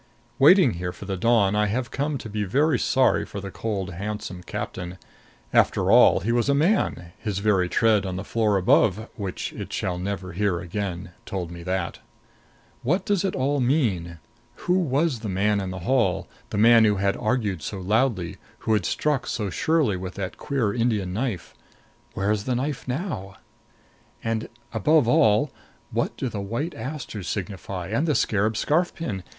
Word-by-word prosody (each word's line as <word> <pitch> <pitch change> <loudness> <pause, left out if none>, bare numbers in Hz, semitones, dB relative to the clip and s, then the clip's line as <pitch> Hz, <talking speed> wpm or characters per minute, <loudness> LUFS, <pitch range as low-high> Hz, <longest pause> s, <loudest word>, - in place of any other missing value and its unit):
Waiting 160 - +7
here 90 0 -2
for 90 - -10
the 95 -1 -2
dawn, 105 -1 +3
I 105 0 +2
have 120 +3 -2
come 145 +1 -1
to 115 - -8
be 105 0 -2
very 135 +7 +2
sorry 130 -1 +3
for 100 - -7
the 100 0 -7
cold 100 -5 -3
handsome 100 -1 -5
captain. 95 -2 -5 0.6
After - - +3
all, - - +6
he 115 - 0
was 120 +3 +1
a 140 - +4
man; 150 - +1
his 105 -4 -3
very 100 -3 +2
tread 110 -1 +3
on 95 -2 -3
the 95 - -4
floor 105 -2 +1
above, 100 +3 +3
which 100 -4 -4
it - - -7
shall 90 -1 -2
never 95 -1 -4
hear 95 -1 0
again, 90 +1 -4 0.2
told 90 -3 -4
me 85 0 -8
that. 90 0 -2 0.8
What 180 +9 0
does 205 -4 +1
it 195 - -1
all 140 +2 +1
mean? 110 - 0 0.5
Who 180 +1 +3
was 145 -4 +1
the 110 -2 -5
man 100 +2 +1
in 95 - -4
the 95 0 -6
hall, 100 -8 +1 0.2
the - - -3
man 115 +1 +7
who 105 -2 +4
had 100 0 +1
argued 110 -7 -1
so 100 - -5
loudly, 100 -2 0 0.2
who 110 - +1
had 105 -5 +1
struck 150 -4 0
so 105 -4 -2
surely 150 - +1
with 95 +1 -6
that 95 -2 -4
queer 125 -8 -1
Indian 110 -6 0
knife? 110 -4 -3 0.6
Where 100 +1 0
is 105 -1 -1
the 125 - 0
knife 135 +2 -3
now? 125 - -4 0.9
And, 115 0 -2 0.2
above 135 +5 +3
all, 115 +3 +4 0.4
what - - -1
do - - -2
the 105 -4 -4
white 120 - -3
asters 115 - -6
signify? 95 -2 -4
And 115 +10 0
the 150 - +2
scarab 110 +1 +1
scarf 165 +9 +1
pin? 105 - -4
105 Hz, 180 wpm, -25 LUFS, 95-130 Hz, 0.9 s, Waiting